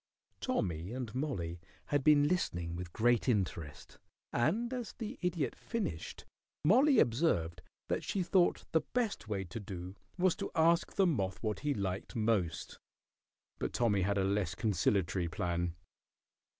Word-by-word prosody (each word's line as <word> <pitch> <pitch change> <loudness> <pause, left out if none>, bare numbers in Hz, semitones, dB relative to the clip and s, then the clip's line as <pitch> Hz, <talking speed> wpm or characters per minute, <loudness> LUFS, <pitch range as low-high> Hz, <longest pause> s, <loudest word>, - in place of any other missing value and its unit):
Tommy 85 +2 -1
and 125 -4 -4
Mollie 100 - -2 0.3
had 145 -2 +2
been 145 0 +6
listening 90 - -1
with 85 0 -6
great 120 +5 +2
interest, 90 - -2 0.3
and 230 - +1
as 245 -3 -4
the 230 +1 -6
Idiot 175 -5 -1
finished 215 - -4 0.4
Mollie 260 - +6
observed 90 - +2 0.3
that - - -1
she 195 - -1
thought 180 0 +2
the 160 - +3
best 230 - 0
way 100 -3 -2
to 95 +6 -7
do 95 -2 -7 0.2
was 185 -1 +3
to - - -3
ask 165 +1 +3
the 195 - +4
moth 100 - 0
what 105 -1 -1
he 145 0 0
liked 95 +2 -3
most, 100 -7 0 0.8
but - - -2
Tommy 105 -5 +2
had 100 +2 +1
a 95 - +2
less 95 -3 0
conciliatory 95 -3 +1
plan. 85 0 -2
110 Hz, 145 wpm, -33 LUFS, -, 0.8 s, been